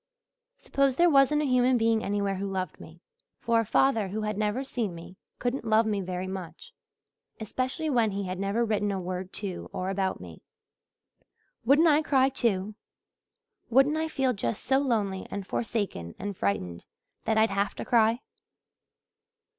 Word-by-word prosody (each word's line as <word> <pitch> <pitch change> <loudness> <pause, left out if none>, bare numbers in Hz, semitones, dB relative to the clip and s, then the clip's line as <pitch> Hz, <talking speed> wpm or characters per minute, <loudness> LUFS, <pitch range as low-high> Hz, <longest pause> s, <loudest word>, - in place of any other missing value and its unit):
Suppose 275 - +1
there 345 +2 +4
wasn't 290 +2 +4
a 270 -3 0
human 250 0 +4
being 225 -1 +2
anywhere 200 -1 -1
who 195 +1 -3
loved 185 -1 -3
me 165 +2 -13 0.4
for 230 -1 +2
a 225 - 0
father 225 -6 +3
who 210 +3 -4
had 210 0 -2
never 210 +5 -1
seen 230 -9 -3
me 170 +2 -11 0.2
couldn't 250 +2 -2
love 220 0 +3
me 210 -2 0
very 180 0 -4
much, 190 - -8 0.7
especially 255 +8 -3
when 240 -7 +2
he 200 0 -3
had 185 -1 -4
never 200 +4 0
written 210 -2 0
a 195 - -2
word 185 +1 -5
to 195 -4 -4
or 185 +1 -3
about 190 -1 -1
me. 85 -3 -11 1.2
Wouldn't 290 +7 +5
I 305 -1 +5
cry, 270 -3 +3
too? 215 -5 0 1.0
Wouldn't 270 +5 +4
I 320 0 -1
feel 270 -5 0
just 120 - -3
so 265 0 +3
lonely 210 -8 -1
and 200 -1 -5
forsaken 200 - -3
and 205 -1 -5
frightened 90 - -2 0.4
that 220 - +1
I'd 220 0 +4
have 200 +1 -1
to - - -6
cry? 230 +1 +3
215 Hz, 165 wpm, -28 LUFS, 190-255 Hz, 1.2 s, Wouldn't